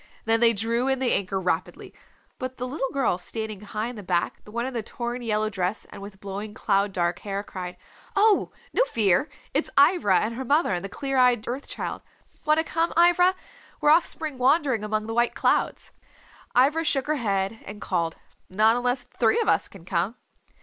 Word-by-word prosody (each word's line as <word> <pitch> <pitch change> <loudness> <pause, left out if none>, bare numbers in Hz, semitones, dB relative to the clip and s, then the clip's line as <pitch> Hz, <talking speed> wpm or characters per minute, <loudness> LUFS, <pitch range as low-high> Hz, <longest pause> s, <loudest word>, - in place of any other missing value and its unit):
Then 225 0 +3
they 235 0 +6
drew 230 +4 0
in 265 0 +2
the 260 -2 +1
anchor 195 0 -1
rapidly. 185 -1 -3 0.5
But 255 -1 -5
the 250 - -3
little 270 0 -2
girl 260 -10 0
sitting 215 +1 -5
high 210 +1 -4
in 245 - -7
the 210 - -7
back, 175 -2 -1
the 210 - -12
one 235 +2 -2
in 260 - -4
the 235 - -2
torn 240 +3 -5
yellow 215 -2 0
dress 190 -1 -2
and - - -10
with 200 -1 -10
blowing 200 +2 -6
cloud 200 -2 +1
dark 175 -2 -1
hair, 200 0 -4
cried, 180 -3 -7 0.4
"Oh, 410 0 +4 0.2
no - - +4
fear, 215 - +2 0.2
it's - - 0
Ivra 280 - +5
and 220 +2 -2
her 260 +3 -4
mother 285 - +2
and 175 - -2
the 195 - -5
clear 270 +4 -3
eyed 245 -3 +3
Earth 255 +4 -4
Child. - - -4 0.4
Want 305 0 +4
to 320 - +2
come, 330 +1 0
Ivra? 350 +2 +5 0.4
We're 295 - +4
off 330 +2 +5
spring 305 -5 -5
wandering 265 -4 +2
among 215 0 -1
the 225 - -4
white 240 +1 +1
clouds." - - 0 0.7
Ivra 295 +6 +4
shook 275 -4 +1
her 305 0 0
head 195 0 -1
and 205 +1 -9
called, 170 -5 -2 0.3
"Not 215 +4 +4
unless 245 +1 0
three 460 - +1
of 460 - 0
us - - +2
can 185 -4 -15
come." 185 +5 -1
230 Hz, 200 wpm, -25 LUFS, 200-270 Hz, 0.7 s, they